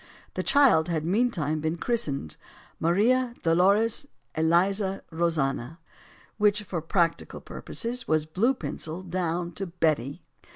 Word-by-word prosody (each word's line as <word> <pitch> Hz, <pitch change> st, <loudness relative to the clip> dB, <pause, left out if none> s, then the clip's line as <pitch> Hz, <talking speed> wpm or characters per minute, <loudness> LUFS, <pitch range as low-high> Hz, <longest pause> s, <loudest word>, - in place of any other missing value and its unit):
The -, -, -2 dB
child 250 Hz, -, +4 dB
had 160 Hz, -2 st, -1 dB
meantime 170 Hz, -, 0 dB
been 160 Hz, +2 st, -2 dB
christened 145 Hz, -, -2 dB, 0.4 s
Maria 235 Hz, +9 st, +2 dB
Dolores 200 Hz, +10 st, +3 dB, 0.3 s
Eliza 190 Hz, +5 st, +1 dB
Rosanna; 160 Hz, -4 st, -1 dB, 0.6 s
which, 210 Hz, 0 st, +3 dB
for 180 Hz, -4 st, -4 dB
practical 165 Hz, +1 st, 0 dB
purposes, 245 Hz, +2 st, -4 dB
was 155 Hz, -1 st, +2 dB
blue 210 Hz, +12 st, +1 dB
penciled 175 Hz, -5 st, -6 dB
down 175 Hz, -1 st, -1 dB
to 190 Hz, +3 st, -5 dB
"Betty." 155 Hz, -5 st, -1 dB
175 Hz, 115 wpm, -27 LUFS, 160-210 Hz, 0.6 s, child